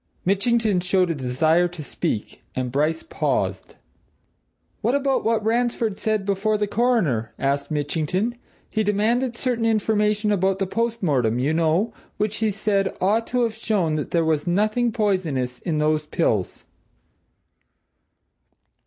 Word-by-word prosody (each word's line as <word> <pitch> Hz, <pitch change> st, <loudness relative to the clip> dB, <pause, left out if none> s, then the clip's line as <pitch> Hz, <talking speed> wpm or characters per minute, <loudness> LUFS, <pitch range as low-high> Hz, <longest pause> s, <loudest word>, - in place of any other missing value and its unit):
Mitchington 205 Hz, +1 st, +2 dB
showed 180 Hz, 0 st, +1 dB
a -, -, +1 dB
desire 155 Hz, +6 st, +2 dB
to 175 Hz, -3 st, -8 dB
speak, 110 Hz, -5 st, -3 dB
and 125 Hz, -1 st, -2 dB
Bryce 155 Hz, +4 st, 0 dB
paused. -, -, -2 dB, 1.1 s
"What 235 Hz, +5 st, +1 dB
about 275 Hz, -1 st, +1 dB
what 225 Hz, -1 st, +1 dB
Ransford 230 Hz, -2 st, +1 dB
said 215 Hz, -1 st, -1 dB
before 205 Hz, +2 st, +1 dB
the 210 Hz, -, 0 dB
Coroner?" 200 Hz, -, 0 dB
asked 140 Hz, +1 st, -1 dB
Mitchington. 160 Hz, +8 st, -1 dB, 0.4 s
"He 220 Hz, -, 0 dB
demanded 230 Hz, +4 st, +1 dB
certain 245 Hz, -3 st, -1 dB
information 210 Hz, -1 st, +1 dB
about 195 Hz, -1 st, +1 dB
the 195 Hz, -, 0 dB
post 230 Hz, +3 st, -2 dB
mortem, 125 Hz, -8 st, +2 dB
you 135 Hz, +5 st, +1 dB
know, 165 Hz, +7 st, +1 dB, 0.2 s
which, 210 Hz, 0 st, -1 dB
he 220 Hz, -1 st, +1 dB
said, 200 Hz, -1 st, 0 dB
ought 215 Hz, +5 st, +1 dB
to 250 Hz, 0 st, +1 dB
have 230 Hz, -2 st, 0 dB
shown 210 Hz, -7 st, 0 dB
that 155 Hz, -1 st, -2 dB
there 165 Hz, -1 st, +1 dB
was 155 Hz, 0 st, 0 dB
nothing 215 Hz, +6 st, +1 dB
poisonous 170 Hz, -, -1 dB
in 165 Hz, -3 st, -2 dB
those 150 Hz, 0 st, +1 dB
pills." 110 Hz, -, -1 dB
195 Hz, 140 wpm, -23 LUFS, 155-220 Hz, 1.1 s, Mitchington